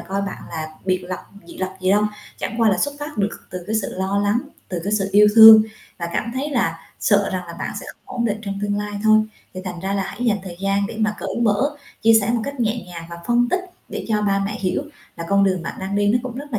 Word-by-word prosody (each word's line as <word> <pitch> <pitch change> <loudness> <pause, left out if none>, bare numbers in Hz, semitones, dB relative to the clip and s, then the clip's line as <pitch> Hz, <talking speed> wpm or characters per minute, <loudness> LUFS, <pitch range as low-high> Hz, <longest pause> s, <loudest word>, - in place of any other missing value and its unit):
coi 195 +1 -3
bạn 195 - -5
là 160 -2 -4 0.2
biệt 185 -1 0
lập 185 - -3 0.3
dị - - -11
lập 190 0 -3
gì 185 0 +1
đâu, 205 +2 +4 0.3
chẳng 235 - -3
qua 225 - +5
là 190 - +1
xuất 285 +9 0
phát 295 -4 -6
được 205 +1 +1 0.2
từ 180 -1 -6
cái 220 - 0
sự - - -5
lo 190 +2 -1
lắng, 205 +3 +2 0.3
từ 180 -2 -3
cái 200 - -1
sự 200 -2 +1
yêu 210 +1 +7
thương 220 -1 +11 0.4
và 170 -1 -3
cảm 230 - -1
thấy 280 +3 -2
là 165 - 0 0.2
sợ 200 -2 +3
rằng 180 -1 -3
là 170 - -8
bạn - - -3
sẽ - - -10
không - - -11
ổn 235 - 0
định 215 -2 0
trong 200 -2 -4
tương 205 0 0
lai 210 0 -4
thôi. 215 0 +6 0.3
Thì 185 - -5
thành 180 -2 -5
ra 190 +2 -2
là 200 - 0
hãy 200 +5 -5
dành 215 -4 +2
thời 175 -2 -8
gian 195 +1 +1
để 225 +1 -7
mà 215 -1 +1
cởi - - -4
mở, 235 +7 +1 0.3
chia 225 0 +6
sẻ 205 +2 -1
một 235 - +1
cách 280 -2 -5
nhẹ 230 0 0
nhàng 170 -2 -8
và 170 - -6
phân 240 0 +3
tích 365 - +1 0.3
để - - -5
cho 210 -1 +1
ba 195 -1 +1
mẹ 210 +1 -3
hiểu 185 +7 0 0.3
là 170 - -5
con 200 0 +4
đường 185 -3 +1
bạn - - -5
đang 190 +1 -3
đi 205 0 +2
nó 230 +4 +4
cũng 255 -2 -6
rất 285 +1 -8
là 220 - +1
205 Hz, 280 wpm, -21 LUFS, 190-225 Hz, 0.4 s, thương